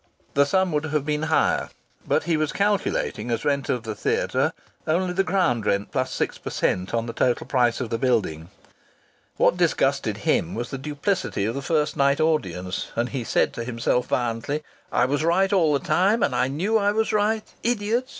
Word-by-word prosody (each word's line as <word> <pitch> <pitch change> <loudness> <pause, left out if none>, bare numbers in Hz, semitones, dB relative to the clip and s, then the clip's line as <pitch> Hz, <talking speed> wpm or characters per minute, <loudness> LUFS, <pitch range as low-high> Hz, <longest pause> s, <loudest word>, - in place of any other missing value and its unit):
The 140 0 +4
sum 190 +3 +2
would 150 0 0
have 150 -2 -1
been 150 0 -1
higher, 160 - +2 0.4
but - - +2
he 165 0 +1
was 155 -1 0
calculating 200 - 0
as 115 - -2
rent 140 -2 0
of 125 -3 0
the 110 -1 -4
theatre - - 0 0.4
only 180 +3 +1
the 195 +2 +2
ground 150 - +1
rent 100 +1 0
plus - - -1
six - - -2
per - - -6
cent 90 +1 -1
on 115 -1 0
the 115 - -5
total 120 +1 +1
price 120 -3 +1
of 120 -3 -4
the 115 - -1
building. 95 - 0 0.9
What - - +3
disgusted - - +1
him 85 - +1
was 120 +2 -4
the 135 - -4
duplicity 150 - -1
of 115 - -1
the 140 - -4
first 150 0 0
night 140 0 +2
audience, 95 - -1
and 120 +2 0
he 130 -4 -3
said - - +1
to 115 - -4
himself 125 +1 0
violently, 120 +5 -1 0.3
"I 125 - +3
was 145 +3 0
right 190 +4 +2
all 165 -6 +4
the 140 - 0
time, 200 +5 +3
and 135 - +1
I 125 +1 +2
knew 190 +11 +1
I 205 0 +2
was 220 +1 0
right! 215 +1 +1 0.2
Idiots! 235 +2 0
145 Hz, 200 wpm, -24 LUFS, 120-185 Hz, 0.9 s, The